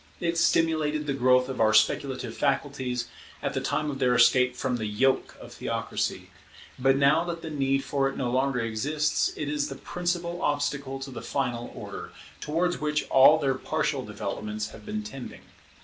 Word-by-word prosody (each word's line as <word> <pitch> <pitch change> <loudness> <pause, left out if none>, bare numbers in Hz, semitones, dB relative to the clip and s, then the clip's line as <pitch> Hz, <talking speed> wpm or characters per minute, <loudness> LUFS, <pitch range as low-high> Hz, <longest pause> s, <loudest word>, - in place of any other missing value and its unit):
It 170 -1 -1
stimulated 155 -3 +2
the 140 - -1
growth 125 -1 +3
of 130 -3 -3
our 110 -1 +4
speculative 120 +2 +1
faculties 135 -3 -1 0.4
at - - -1
the - - -1
time 150 -1 -1
of 135 - -6
their 125 -2 +3
escape 125 +1 +5
from 125 -1 -1
the 110 -2 -3
yoke 130 +6 +1
of - - -11
theocracy: - - -3 0.5
but 135 +1 +4
now 140 +4 +4
that 170 -1 -5
the 160 - -5
need 135 -2 +1
for 135 -1 0
it 135 - -8
no 125 -2 -1
longer 130 0 +1
exists, 145 +7 0
it 150 - -4
is 145 0 -1
the 135 - -6
principal 175 +2 -3
obstacle 145 -2 -1
to 135 0 -6
the - - -7
final 120 -4 -2
order, - - -7 0.3
towards 175 +4 0
which 150 -1 0
all 135 +4 +8
their 135 -3 +1
partial 145 0 -1
developments 105 0 -4
have - - -13
been 215 0 -3
tending. 135 -12 -8
135 Hz, 180 wpm, -27 LUFS, 125-150 Hz, 0.5 s, all